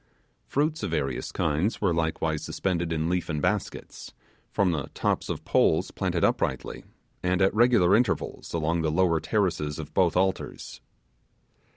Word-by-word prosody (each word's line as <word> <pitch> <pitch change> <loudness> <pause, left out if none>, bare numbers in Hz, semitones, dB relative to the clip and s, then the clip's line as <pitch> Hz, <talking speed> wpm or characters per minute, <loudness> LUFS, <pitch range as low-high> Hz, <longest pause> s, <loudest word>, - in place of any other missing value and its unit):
Fruits 155 +3 0
of 100 - -2
various 70 -6 -2
kinds 80 +8 0
were 95 -4 +1
likewise 80 -1 -1
suspended 85 -3 -2
in 80 0 0
leafen 85 -3 -1
baskets, - - -3 0.4
from 95 -3 +2
the 75 -5 -2
tops - - -1
of - - -4
poles - - +2
planted - - -1
uprightly, - - 0 0.4
and 90 0 +1
at 95 0 +3
regular 110 -5 +5
intervals, 120 +2 -1
along 85 +1 0
the 80 - 0
lower 85 0 +2
terraces 85 -7 -1
of 80 - -7
both 90 -2 +2
altars. 95 -9 -2
85 Hz, 145 wpm, -26 LUFS, 80-95 Hz, 0.4 s, regular